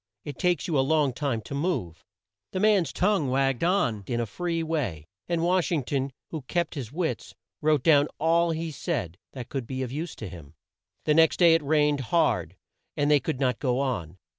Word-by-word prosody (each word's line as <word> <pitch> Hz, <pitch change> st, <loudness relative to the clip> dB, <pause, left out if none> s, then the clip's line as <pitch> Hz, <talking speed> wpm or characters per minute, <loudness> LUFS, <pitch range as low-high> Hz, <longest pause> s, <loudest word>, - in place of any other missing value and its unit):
It 145 Hz, -, -7 dB
takes 180 Hz, 0 st, +1 dB
you 155 Hz, -5 st, +1 dB
a -, -, +5 dB
long 145 Hz, -1 st, +2 dB
time 130 Hz, -4 st, -2 dB
to 125 Hz, -, -9 dB
move." 140 Hz, -, -2 dB, 0.5 s
The 185 Hz, -, -1 dB
man's 200 Hz, -7 st, +3 dB
tongue 185 Hz, -8 st, +1 dB
wagged 135 Hz, 0 st, +1 dB
on 125 Hz, -, +1 dB
in 120 Hz, -, -1 dB
a 120 Hz, -, 0 dB
free 165 Hz, -, -2 dB
way, 130 Hz, -, -2 dB, 0.2 s
and 170 Hz, -1 st, 0 dB
Wash 180 Hz, 0 st, +2 dB
ing 155 Hz, -5 st, +1 dB
ton, 135 Hz, +1 st, -2 dB, 0.2 s
who 160 Hz, -, -3 dB
had 135 Hz, -4 st, -10 dB
kept 175 Hz, -2 st, -1 dB
his 125 Hz, -6 st, -6 dB
wits, 165 Hz, +2 st, -3 dB, 0.3 s
wrote 150 Hz, -3 st, +2 dB
down 145 Hz, -2 st, +5 dB
all 170 Hz, +2 st, +3 dB
he 165 Hz, 0 st, -2 dB
said 120 Hz, -, -3 dB
that 125 Hz, -3 st, -7 dB
could 135 Hz, -4 st, -4 dB
be 130 Hz, 0 st, -3 dB
of 125 Hz, -, -5 dB
use 155 Hz, +3 st, -4 dB
to 110 Hz, -, -7 dB
him. 80 Hz, -4 st, -11 dB, 0.5 s
The 150 Hz, -, +3 dB
next 160 Hz, +1 st, +4 dB
day 170 Hz, -2 st, +6 dB
it 165 Hz, -, +3 dB
rained 150 Hz, 0 st, +2 dB
hard 95 Hz, -, +1 dB, 0.4 s
and 145 Hz, +1 st, +2 dB
they 145 Hz, -, +6 dB
could 130 Hz, -, -3 dB
not 125 Hz, -4 st, +1 dB
go 125 Hz, -2 st, 0 dB
on. 95 Hz, -, -2 dB
145 Hz, 210 wpm, -26 LUFS, 125-165 Hz, 0.5 s, day